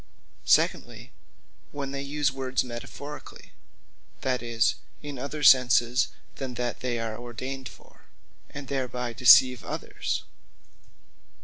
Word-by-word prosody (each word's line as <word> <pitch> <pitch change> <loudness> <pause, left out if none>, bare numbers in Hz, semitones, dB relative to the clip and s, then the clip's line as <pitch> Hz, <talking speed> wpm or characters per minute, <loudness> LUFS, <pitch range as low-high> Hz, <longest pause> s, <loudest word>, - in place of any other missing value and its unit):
Secondly, - - +1 0.6
when 140 -1 -5
they 140 0 -4
use 140 0 0
words 130 -1 -1
metaphorically; 130 +4 -9 0.7
that 130 -2 0
is, 115 -1 +1 0.3
in 145 -3 -6
other 145 +3 -5
sense 125 -1 +5 0.3
than 130 -2 -5
that 120 0 -3
they 125 -2 -2
are 115 -1 -3
ordained 130 +2 -6
for; - - -19 0.4
and 145 -2 -8
thereby 125 -3 -3
deceive 125 0 +7
others. - - -4
130 Hz, 110 wpm, -27 LUFS, 120-135 Hz, 0.7 s, deceive